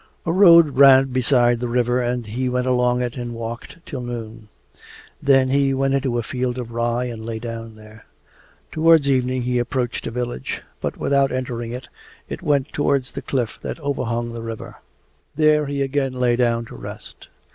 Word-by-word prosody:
A 165 Hz, -, 0 dB
road 170 Hz, -7 st, +6 dB
ran 135 Hz, -1 st, +7 dB
beside 125 Hz, -1 st, +3 dB
the 120 Hz, -, -2 dB
river 120 Hz, +1 st, +1 dB
and 120 Hz, -1 st, -2 dB
he 125 Hz, +4 st, -2 dB
went 125 Hz, 0 st, -1 dB
along 125 Hz, -1 st, +2 dB
it 120 Hz, +1 st, -4 dB
and 120 Hz, -1 st, -5 dB
walked 115 Hz, +4 st, -7 dB
till 135 Hz, -5 st, -6 dB
noon. 115 Hz, -2 st, -7 dB, 0.7 s
Then 135 Hz, -2 st, +4 dB
he 135 Hz, 0 st, +2 dB
went 135 Hz, 0 st, +1 dB
into 135 Hz, -3 st, 0 dB
a 120 Hz, -, -1 dB
field 125 Hz, +2 st, -3 dB
of 120 Hz, -2 st, -6 dB
rye 120 Hz, +1 st, -1 dB
and 115 Hz, -3 st, -6 dB
lay 115 Hz, 0 st, -4 dB
down 115 Hz, -1 st, -7 dB
there. 110 Hz, 0 st, -15 dB, 0.7 s
Towards 160 Hz, -2 st, +4 dB
evening 130 Hz, -2 st, +1 dB
he 125 Hz, 0 st, 0 dB
approached 120 Hz, 0 st, -2 dB
a -, -, -2 dB
village, 120 Hz, -, -4 dB, 0.2 s
but -, -, -3 dB
without 140 Hz, -1 st, +2 dB
entering 120 Hz, -2 st, -4 dB
it 125 Hz, +2 st, -7 dB, 0.5 s
went 145 Hz, -1 st, 0 dB
towards 140 Hz, -3 st, 0 dB
the -, -, -6 dB
cliff 120 Hz, -4 st, -2 dB
that -, -, -5 dB
overhung 120 Hz, -5 st, -2 dB
the 115 Hz, -, -6 dB
river. 115 Hz, -1 st, -7 dB, 0.6 s
There 150 Hz, -1 st, +3 dB
he 140 Hz, 0 st, -1 dB
again 135 Hz, -1 st, -1 dB
lay 125 Hz, -1 st, +1 dB
down 120 Hz, -1 st, +1 dB
to -, -, -11 dB
rest. -, -, -10 dB
125 Hz, 180 wpm, -21 LUFS, 120-135 Hz, 0.7 s, ran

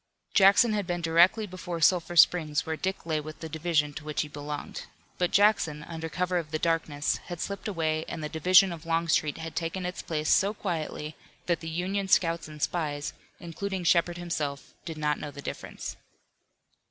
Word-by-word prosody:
Jackson 200 Hz, +3 st, +6 dB
had 205 Hz, -3 st, -1 dB
been 175 Hz, -1 st, -2 dB
directly 175 Hz, +6 st, +4 dB
before 180 Hz, -3 st, -6 dB
Sulphur 175 Hz, 0 st, +3 dB
Springs 160 Hz, -3 st, +4 dB
where 160 Hz, -, -2 dB
Dick 190 Hz, +2 st, -3 dB
lay 160 Hz, -2 st, 0 dB
with 155 Hz, +1 st, -9 dB
the 160 Hz, -, -6 dB
division 155 Hz, -2 st, 0 dB
to 145 Hz, -, -8 dB
which 150 Hz, 0 st, -1 dB
he -, -, -7 dB
belonged. 145 Hz, 0 st, -6 dB, 0.3 s
But 180 Hz, -1 st, +2 dB
Jackson, 195 Hz, -8 st, +3 dB
under 165 Hz, 0 st, -6 dB
cover 180 Hz, +2 st, 0 dB
of 160 Hz, -3 st, -6 dB
the 155 Hz, -, -1 dB
darkness, 155 Hz, -3 st, 0 dB
had 175 Hz, -2 st, -6 dB
slipped 200 Hz, +3 st, -4 dB
away 160 Hz, -5 st, -1 dB
and 160 Hz, -, -5 dB
the -, -, -1 dB
division 180 Hz, +4 st, +5 dB
of 165 Hz, 0 st, -10 dB
Longstreet 165 Hz, -2 st, +1 dB
had 160 Hz, 0 st, -7 dB
taken 175 Hz, +2 st, -3 dB
its 180 Hz, 0 st, -4 dB
place 155 Hz, -2 st, -2 dB
so 200 Hz, +2 st, +3 dB
quietly 155 Hz, -5 st, -4 dB, 0.3 s
that 170 Hz, -2 st, +1 dB
the 165 Hz, -, -6 dB
Union 190 Hz, +4 st, -2 dB
scouts 170 Hz, -3 st, +2 dB
and 155 Hz, -1 st, -11 dB
spies, 145 Hz, -4 st, -2 dB, 0.3 s
including 185 Hz, +2 st, -4 dB
Shepard 175 Hz, +1 st, +3 dB
himself, 150 Hz, -5 st, -4 dB
did 160 Hz, -2 st, -6 dB
not 150 Hz, -1 st, 0 dB
know 150 Hz, -, -5 dB
the 145 Hz, -, -11 dB
difference. -, -, -6 dB
165 Hz, 185 wpm, -28 LUFS, 155-180 Hz, 0.3 s, Jackson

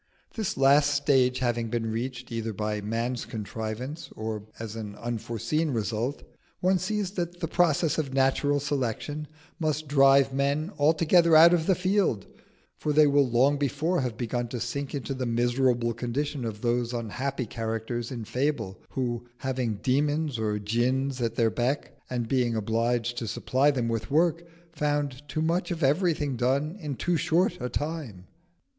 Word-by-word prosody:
This 220 Hz, -5 st, -2 dB
last 140 Hz, +2 st, +5 dB
stage 135 Hz, -3 st, +3 dB
having 120 Hz, -2 st, -1 dB
been 115 Hz, -1 st, -1 dB
reached, 125 Hz, +2 st, -4 dB
either 115 Hz, -1 st, -3 dB
by 105 Hz, +1 st, -2 dB
man's 115 Hz, +4 st, -2 dB
contrivance 110 Hz, +7 st, -5 dB
or 110 Hz, -1 st, -4 dB, 0.2 s
as 110 Hz, -1 st, -6 dB
an 105 Hz, -3 st, -6 dB
unforeseen 120 Hz, +7 st, -2 dB
result, 115 Hz, +2 st, -2 dB, 0.4 s
one 185 Hz, 0 st, +2 dB
sees 195 Hz, +1 st, -2 dB
that 175 Hz, -2 st, -4 dB
the 165 Hz, -, -2 dB
process 165 Hz, -2 st, +2 dB
of 140 Hz, -4 st, -2 dB
natural 135 Hz, +2 st, +2 dB
selection 145 Hz, +2 st, -2 dB, 0.3 s
must 155 Hz, -1 st, -1 dB
drive 135 Hz, -1 st, +5 dB
men 140 Hz, +5 st, 0 dB
altogether 165 Hz, +2 st, +4 dB
out 165 Hz, +2 st, +9 dB
of 165 Hz, -2 st, +1 dB
the 190 Hz, -, +4 dB
field; 185 Hz, -, +1 dB, 0.5 s
for 150 Hz, -, -1 dB
they 150 Hz, +1 st, +6 dB
will 140 Hz, -2 st, +3 dB
long 135 Hz, +5 st, +3 dB
before 150 Hz, +5 st, 0 dB
have 125 Hz, -4 st, -3 dB
begun 120 Hz, 0 st, -2 dB
to 120 Hz, +1 st, -5 dB
sink 135 Hz, +5 st, -3 dB
into 135 Hz, 0 st, -3 dB
the 130 Hz, -2 st, -3 dB
miserable 120 Hz, 0 st, +1 dB
condition 125 Hz, +3 st, -3 dB
of 105 Hz, -2 st, -5 dB
those 120 Hz, 0 st, 0 dB
unhappy 125 Hz, +3 st, -3 dB
characters 115 Hz, +1 st, -3 dB
in 120 Hz, -4 st, -5 dB
fable 125 Hz, -7 st, -2 dB
who, 120 Hz, -2 st, -3 dB
having 125 Hz, -4 st, -2 dB
demons 145 Hz, 0 st, +1 dB
or 105 Hz, -1 st, 0 dB
djinns 125 Hz, +5 st, 0 dB
at 115 Hz, -1 st, -1 dB
their 115 Hz, -2 st, +2 dB
beck, 125 Hz, +6 st, -1 dB
and 120 Hz, -2 st, -2 dB
being 120 Hz, -2 st, +1 dB
obliged 115 Hz, +2 st, 0 dB
to 115 Hz, -, -4 dB
supply 130 Hz, +6 st, +2 dB
them 125 Hz, -5 st, 0 dB
with 115 Hz, +1 st, -2 dB
work, 165 Hz, +3 st, +2 dB, 0.3 s
found 145 Hz, -3 st, -1 dB
too 155 Hz, -, -1 dB
much 170 Hz, +2 st, 0 dB
of 170 Hz, -2 st, -3 dB
everything 150 Hz, -1 st, +2 dB
done 135 Hz, +7 st, 0 dB
in 150 Hz, -6 st, -4 dB
too 175 Hz, +6 st, 0 dB
short 175 Hz, +3 st, +2 dB
a 125 Hz, -, -2 dB
time. 145 Hz, -, -4 dB
130 Hz, 160 wpm, -27 LUFS, 115-150 Hz, 0.5 s, out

